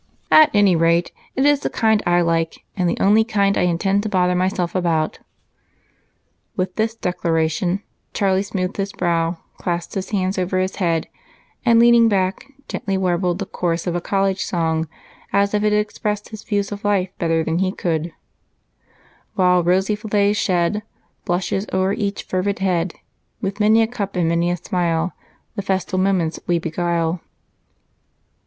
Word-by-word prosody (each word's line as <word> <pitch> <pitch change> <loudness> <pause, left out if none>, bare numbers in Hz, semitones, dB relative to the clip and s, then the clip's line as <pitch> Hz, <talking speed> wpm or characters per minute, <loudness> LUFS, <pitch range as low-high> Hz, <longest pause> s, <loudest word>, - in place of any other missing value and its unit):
At 310 -1 +8
any 205 -3 +4
rate, 165 +1 +2 0.2
it 265 - +2
is 290 -1 +4
the - - -2
kind 220 -2 +2
I 175 0 +4
like 165 -1 -1
and 180 -3 +1
the - - -1
only 210 +3 +5
kind 200 -3 +1
I - - +1
intend 195 +4 +1
to 215 - -3
bother 180 -2 +2
myself 180 -1 0
about." 165 -4 0 1.4
With 185 0 -2
this 220 +1 0
declaration, 175 0 -1 0.3
Charlie 195 -2 +1
smoothed 190 -1 -3
his 195 0 -2
brow, 170 -1 0 0.2
clasped 175 -1 -3
his 190 -1 -4
hands 190 -2 -1
over 185 +1 -1
his 185 +1 -1
head, 170 -4 0 0.6
and, 235 -2 +5
leaning 235 -1 +6
back, 190 +4 0 0.2
gently 195 -1 -2
warbled 180 -1 0
the 195 - -3
chorus 170 -2 -2
of 175 -2 -1
a 175 - -1
college 195 0 0
song 160 -2 -1 0.4
as 200 0 +2
if 210 0 +1
it 210 - +3
expressed 210 0 -1
his 215 -2 -8
views 205 -2 -2
of 205 0 -6
life 200 -3 +1
better 165 -2 +1
than 160 +2 -1
he 190 0 +1
could: 165 -3 -2 1.2
"While 180 -3 +4
our - - +3
rosy 190 +4 +2
fillets 205 -1 +1
shed 185 +1 +1 0.4
Blushes 185 +3 -1
o'er 190 +1 +1
each 205 -2 -2
fervid 185 +2 -1
head, 180 -2 0 0.4
With 195 -2 -4
many 215 +2 +5
a - - 0
cup 205 -5 -5
and 175 -2 +1
many 170 +1 +1
a 175 - 0
smile 170 0 -1 0.4
The 200 - -2
festal 190 -1 -1
moments 185 -4 +1
we 175 - +2
beguile." 170 0 -1
185 Hz, 165 wpm, -20 LUFS, 175-205 Hz, 1.4 s, At